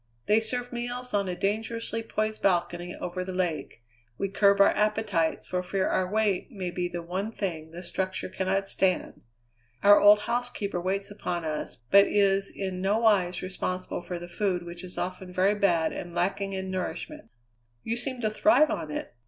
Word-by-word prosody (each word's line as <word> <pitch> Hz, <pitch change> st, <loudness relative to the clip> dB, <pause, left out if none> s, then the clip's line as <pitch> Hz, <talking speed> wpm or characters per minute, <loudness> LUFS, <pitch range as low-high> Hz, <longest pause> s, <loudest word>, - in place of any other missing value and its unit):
They 210 Hz, +1 st, +4 dB
serve 245 Hz, +2 st, -2 dB
meals 245 Hz, +1 st, -4 dB
on 200 Hz, -2 st, +1 dB
a 180 Hz, -, -2 dB
dangerously 225 Hz, +3 st, -2 dB
poised 215 Hz, -1 st, -2 dB
balcony 175 Hz, -1 st, 0 dB
over 185 Hz, +1 st, -4 dB
the 185 Hz, 0 st, -5 dB
lake; 170 Hz, -9 st, -2 dB, 0.3 s
we 195 Hz, -, -1 dB
curb 200 Hz, 0 st, +4 dB
our 200 Hz, -, +7 dB
appetites 210 Hz, -6 st, +1 dB
for 180 Hz, 0 st, -1 dB
fear 190 Hz, +1 st, -1 dB
our 185 Hz, -1 st, +1 dB
weight 210 Hz, -1 st, +1 dB
may 190 Hz, -7 st, -4 dB
be 175 Hz, 0 st, -2 dB
the 175 Hz, -1 st, -5 dB
one 190 Hz, +5 st, -3 dB
thing 165 Hz, -8 st, -4 dB
the 170 Hz, +2 st, -9 dB
structure 185 Hz, +2 st, -3 dB
cannot 190 Hz, +1 st, -1 dB
stand. 190 Hz, -2 st, 0 dB, 0.6 s
Our 205 Hz, 0 st, +8 dB
old 205 Hz, 0 st, +7 dB
housekeeper 235 Hz, -6 st, -2 dB
waits 195 Hz, +3 st, -2 dB
upon 175 Hz, -4 st, -3 dB
us, 155 Hz, -1 st, -3 dB, 0.2 s
but 200 Hz, 0 st, +8 dB
is 195 Hz, -1 st, +2 dB
in 190 Hz, -2 st, -4 dB
no 200 Hz, +3 st, +2 dB
wise 195 Hz, -6 st, +2 dB
responsible 185 Hz, -1 st, -3 dB
for 175 Hz, 0 st, -5 dB
the 175 Hz, 0 st, -8 dB
food 180 Hz, 0 st, -1 dB
which 175 Hz, +1 st, -8 dB
is 180 Hz, -1 st, -8 dB
often 180 Hz, +1 st, -4 dB
very 185 Hz, +3 st, +3 dB
bad 175 Hz, -6 st, +2 dB
and 175 Hz, -1 st, -7 dB
lacking 195 Hz, +3 st, -1 dB
in 190 Hz, 0 st, -4 dB
nourishment." 300 Hz, +11 st, -5 dB, 0.5 s
"You 225 Hz, -, -1 dB
seem 250 Hz, +1 st, -1 dB
to 215 Hz, -2 st, 0 dB
thrive 305 Hz, +6 st, +4 dB
on 155 Hz, -, -3 dB
it." 150 Hz, -, -5 dB
195 Hz, 180 wpm, -27 LUFS, 180-210 Hz, 0.6 s, Our